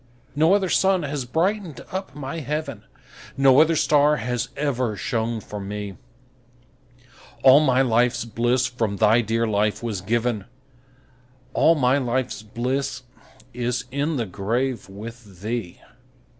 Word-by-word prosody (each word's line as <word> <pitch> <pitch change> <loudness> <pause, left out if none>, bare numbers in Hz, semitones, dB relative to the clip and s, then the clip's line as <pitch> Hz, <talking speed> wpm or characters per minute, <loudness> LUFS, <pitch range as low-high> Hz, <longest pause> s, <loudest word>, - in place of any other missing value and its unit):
No 160 +6 +4
other 195 -2 +1
sun 190 -1 +2
has 140 -2 -3
brightened 170 - -1
up 190 -6 -5
my 145 +2 -5
heaven, 140 -7 -4 0.5
No 135 +1 +6
other 160 +1 +3
star 150 0 +3
has 125 -3 -2
ever 130 -6 -1
shone 115 +1 -2
for 105 0 -8
me; 100 0 -5 1.5
All 135 +2 +8
my 135 -3 +3
life's 120 -1 +2
bliss 120 +3 +1
from 115 -5 -2
thy 110 +3 +4
dear 115 +1 0
life 105 0 0
was 110 -5 -3
given, 115 0 -1 1.1
All 165 - +4
my 135 -1 +3
life's 130 -2 -2
bliss 125 +5 -3 0.5
is 125 +1 -2
in 145 +4 -1
the 120 -4 -1
grave 115 +4 -2
with 105 -2 -11
thee. 110 -5 -4
125 Hz, 130 wpm, -23 LUFS, 110-140 Hz, 1.5 s, All